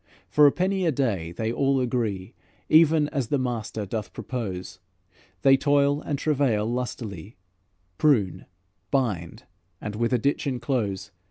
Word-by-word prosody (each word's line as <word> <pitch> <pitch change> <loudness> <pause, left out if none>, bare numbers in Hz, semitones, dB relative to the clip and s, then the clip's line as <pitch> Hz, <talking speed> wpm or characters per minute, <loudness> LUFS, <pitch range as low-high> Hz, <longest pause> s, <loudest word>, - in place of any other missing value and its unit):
For 150 -1 +6
a - - +5
penny 185 +1 0
a - - +3
day 105 - -1
they 110 +6 -2
all 135 +1 +2
agree, 115 -5 -2 0.4
Even 155 -1 +5
as 135 -6 -2
the 145 - +1
master 115 -4 -3
doth 105 +1 -5
propose, 100 -8 -5 0.6
They 135 0 +7
toil 145 +1 +2
and 145 -3 -2
travail 135 -8 +1
lustily, 115 -5 -5 0.6
Prune, 120 -12 +2 0.4
bind, 105 -12 -1 0.4
and 105 -1 -5
with 115 +2 0
a 125 - +3
ditch 140 +5 0
enclose. 110 -7 -2
125 Hz, 140 wpm, -25 LUFS, 105-140 Hz, 0.6 s, They